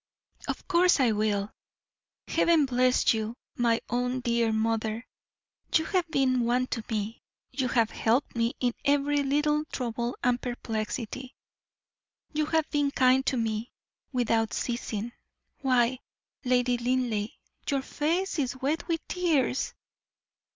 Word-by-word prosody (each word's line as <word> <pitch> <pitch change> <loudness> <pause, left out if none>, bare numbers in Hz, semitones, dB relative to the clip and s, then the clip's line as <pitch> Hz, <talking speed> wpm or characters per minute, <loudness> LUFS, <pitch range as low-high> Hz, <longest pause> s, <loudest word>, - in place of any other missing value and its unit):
'" - - -19
"Of - - -4
course 360 -2 +4
I 250 -4 +4
will. 210 -1 0 0.8
Heaven 330 -4 +4
bless 255 -1 +3
you, 220 +1 -3 0.2
my 235 -1 +2
own 250 +1 -1
dear 235 -1 +1
mother; 220 +1 -1 0.7
you 320 - +4
have 365 -2 0
been 265 -4 +2
one 245 +2 +2
to 230 - -3
me. 215 0 -3 0.3
You 260 -2 -1
have 230 -2 +2
helped 240 +5 +1
me 230 +1 0
in 245 -2 +1
every 285 0 +2
little 295 +2 +1
trouble 240 -3 -3
and 250 0 +2
perplexity; 240 +1 -4 1.0
you 305 0 0
have 320 -1 +1
been 290 -1 +2
kind 260 -1 +4
to 260 - +2
me, 225 0 -1 0.4
without 230 -3 +1
ceasing. 235 -2 -3 0.5
Why, 255 -1 +2 0.4
Lady 250 -1 +2
Linleigh, 240 -4 0 0.4
your 275 -2 +1
face 335 +6 -1
is 265 -2 -1
wet 290 +5 -1
with 335 -2 -2
tears!" 310 -8 0
250 Hz, 130 wpm, -28 LUFS, 230-280 Hz, 1.0 s, course